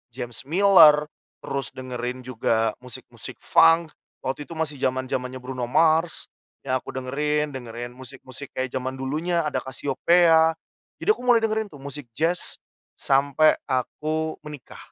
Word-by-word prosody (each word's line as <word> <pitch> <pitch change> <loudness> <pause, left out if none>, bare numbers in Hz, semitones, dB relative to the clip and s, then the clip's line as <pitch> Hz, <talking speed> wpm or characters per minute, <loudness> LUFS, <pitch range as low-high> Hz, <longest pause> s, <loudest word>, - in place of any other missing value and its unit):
James 120 -2 -4
Miller, 160 -4 +6 0.4
terus 135 0 -3
dengerin 125 -1 -5
juga 115 -2 0
musik 125 -3 -9
musik - - -7
Funk. 165 0 +5 0.3
Waktu 135 +3 -3
itu 165 - -8
masih 155 -3 -3
zaman-zamannya 130 0 -2
Bruno 125 -1 -4
Mars 160 +5 +2 0.4
yang 130 -1 0
aku - - -10
dengerin, 150 +3 -1
dengerin 120 -1 -6
musik-musik 130 +1 -9
kayak 130 0 -2
zaman 130 0 -3
dulunya, 160 +6 -1
ada 145 - -2
Casiopea. 160 +5 +3 0.5
Jadi - - -2
aku 430 - -2
mulai 240 -2 +5
dengerin 220 0 0
tuh 145 -2 -13
musik 140 -1 -7
Jazz 165 +7 -1 0.4
sampai 140 +3 +3
aku 155 +4 -2
menikah. 150 -4 -10
140 Hz, 135 wpm, -24 LUFS, 130-160 Hz, 0.5 s, Miller